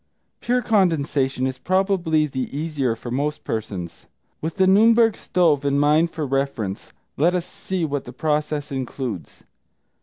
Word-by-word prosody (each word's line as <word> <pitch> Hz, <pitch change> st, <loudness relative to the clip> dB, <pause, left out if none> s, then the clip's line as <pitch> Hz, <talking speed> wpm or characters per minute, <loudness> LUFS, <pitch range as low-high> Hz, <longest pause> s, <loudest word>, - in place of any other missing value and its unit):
Pure 245 Hz, +1 st, 0 dB
condensation 145 Hz, -, +1 dB
is 130 Hz, -1 st, -3 dB
probably 185 Hz, -3 st, +1 dB
the 130 Hz, -3 st, -4 dB
easier 145 Hz, -6 st, -1 dB
for 120 Hz, +1 st, -8 dB
most 145 Hz, +4 st, -2 dB
persons. 95 Hz, -6 st, -5 dB, 0.3 s
With 160 Hz, +1 st, -3 dB
The 190 Hz, -, +3 dB
Nürnberg 225 Hz, +3 st, +5 dB
Stove 160 Hz, -6 st, +1 dB
in 140 Hz, 0 st, +1 dB
mind 150 Hz, +3 st, +3 dB
for 160 Hz, -2 st, -4 dB
reference, 135 Hz, -8 st, -2 dB, 0.3 s
let 170 Hz, +5 st, +3 dB
us 175 Hz, -1 st, -1 dB
see 180 Hz, -1 st, -3 dB
what 145 Hz, -2 st, -3 dB
the 125 Hz, -, -8 dB
process 150 Hz, +1 st, -1 dB
includes. 130 Hz, -6 st, -5 dB
150 Hz, 145 wpm, -22 LUFS, 130-175 Hz, 0.3 s, Nürnberg